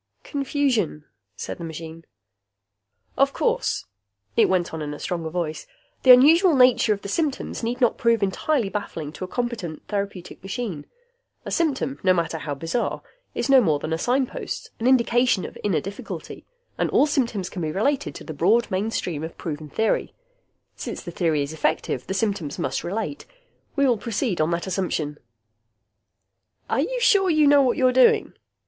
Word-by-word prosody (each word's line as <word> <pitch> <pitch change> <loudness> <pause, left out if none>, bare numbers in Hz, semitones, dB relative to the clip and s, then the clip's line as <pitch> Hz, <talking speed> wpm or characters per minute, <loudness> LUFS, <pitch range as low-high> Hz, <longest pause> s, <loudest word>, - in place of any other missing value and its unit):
"Confusion," 270 - -1 0.3
said - - -6
the - - -6
machine. 165 0 -8 1.1
"Of - - +3
course," - - 0 0.5
it - - +4
went 180 -3 0
on 160 - -4
in 150 -1 -4
a - - -11
stronger 170 -3 -3
voice, 160 -2 -3 0.3
"the 260 - +1
unusual 310 +7 +8
nature 250 -3 +5
of 205 -1 -1
the - - -5
symptoms 290 +6 -2
need 240 +2 -2
not 240 -3 +2
prove 230 -3 +3
entirely 230 +5 0
baffling 165 -7 -5
to 175 - -8
a - - -4
competent 225 -8 -4
therapeutic 200 -3 -4
machine. 195 - -5 0.6
A - - -5
symptom, 280 -4 0
no 185 -2 +4
matter 165 -1 -1
how 145 -2 -4
bizarre, 165 - -2 0.3
is - - -1
no 270 -2 +7
more 160 -9 +2
than 155 +2 -4
a 160 - -1
signpost, 255 +5 -2
an 230 - 0
indication 245 -5 +3
of - - -9
inner 190 -7 +1
difficulty. 195 +6 -8 0.3
And - - +1
all - - +4
symptoms 235 -10 -1
can 180 - -6
be 155 -1 -1
related 275 - 0
to - - -8
the 160 - -7
broad 215 +11 +2
mainstream 185 -5 -2
of 160 - -7
proven 155 -2 -5
theory. 220 +9 0 0.6
Since - - -6
the 175 - -7
theory 160 -4 +1
is 140 +2 -6
effective, 135 -4 -1
the 190 - -2
symptoms 195 -8 -1
must 130 - -2
relate. 220 +9 -4 0.5
We 280 -1 +3
will 245 -5 +2
proceed 225 - -1
on 155 - +2
that 170 0 -1
assumption." 170 -6 -2 1.5
"Are - - +2
you - - -2
sure 400 -6 +4
you 310 -2 +4
know 285 0 +6
what 255 -3 +2
you're 255 -1 +3
doing?" 255 0 +4
200 Hz, 170 wpm, -24 LUFS, 165-255 Hz, 1.5 s, unusual